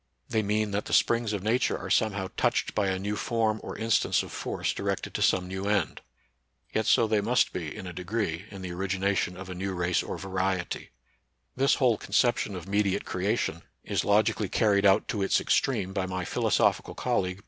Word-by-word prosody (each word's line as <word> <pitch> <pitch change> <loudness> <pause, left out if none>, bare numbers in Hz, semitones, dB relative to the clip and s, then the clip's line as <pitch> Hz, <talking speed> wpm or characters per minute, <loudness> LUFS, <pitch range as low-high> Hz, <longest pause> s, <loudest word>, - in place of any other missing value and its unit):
They 110 - +1
mean 105 0 0
that 105 +1 -1
the - - -5
springs 115 -2 +2
of 100 -3 -3
Nature 115 +4 +1
are - - -6
somehow 100 -4 +1
touched - - +1
by 105 -2 +1
a 95 -1 0
new 100 +2 -2
form 110 -1 0
or - - -7
instance 115 -1 +2
of - - -9
force - - -2
directed - - -3
to - - -3
some 90 -1 +2
new 95 +2 -4
end. 100 -5 0 0.7
Yet 110 - 0
so 115 - +5
they 110 -1 +1
must 120 +4 +2
be 80 -4 -4
in - - -7
a 90 - -6
degree 90 0 -3
in 95 -2 -9
the 90 - -5
origi 95 +2 -2
nation 95 -2 0
of 95 -1 -8
a 95 - -5
new 95 +1 -3
race 90 0 +1
or - - -5
variety. 95 -1 -2 0.7
This 135 +1 +3
whole 120 -6 +2
conception 105 0 +1
of 90 -1 -7
mediate 100 -1 +1
creation 95 -3 -1 0.2
is - - -1
logically 105 -1 +2
car 110 +2 +2
ried 100 0 +4
out 95 - +4
to 105 - -1
its 95 - +3
extreme 105 -8 +1
by 95 -1 -1
my 90 -1 -3
philosophical - - +1
col - - +1
league. 90 +1 -4
100 Hz, 205 wpm, -28 LUFS, 95-110 Hz, 0.7 s, so